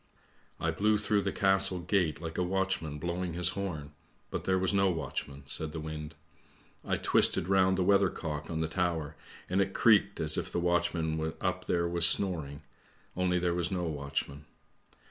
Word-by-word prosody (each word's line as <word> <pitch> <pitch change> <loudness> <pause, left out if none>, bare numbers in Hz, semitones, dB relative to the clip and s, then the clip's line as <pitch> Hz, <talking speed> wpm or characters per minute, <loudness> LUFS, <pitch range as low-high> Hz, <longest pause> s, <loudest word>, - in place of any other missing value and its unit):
" - - -35
I 80 - 0
blew 105 +6 +2
through 105 0 +1
the - - -2
castle 95 -2 +2
gate 85 -2 0
like 80 0 -5
a - - +2
watchman 95 -5 -1
blowing 85 +2 -3
his 90 0 +2
horn, 90 -7 -5 0.4
but - - -4
there 95 0 +2
was 95 +2 +1
no 95 -1 +3
watchman," 70 -4 -4
said 75 +2 0
the 80 - -4
wind. 75 0 -6 0.4
" - - -30 0.2
I - - -1
twisted 85 - +2
round 95 -1 +3
the 95 - +2
weather 100 0 +4
cock 75 -4 -5
on 80 -1 -2
the 80 - 0
tower 80 -3 -2 0.3
and 95 +2 +1
it 95 0 -2
creaked 100 -3 +4
as 75 -1 +4
if - - -5
the - - -1
watchman 80 -3 0
up - - -2
there 85 -1 0
was 85 -1 +4
snoring, 80 -9 0 0.5
only 90 0 +1
there 85 -1 0
was 85 -1 +1
no 90 -2 -1
watch 70 -4 -2
man. 70 +2 -12
85 Hz, 190 wpm, -30 LUFS, 80-95 Hz, 0.5 s, weather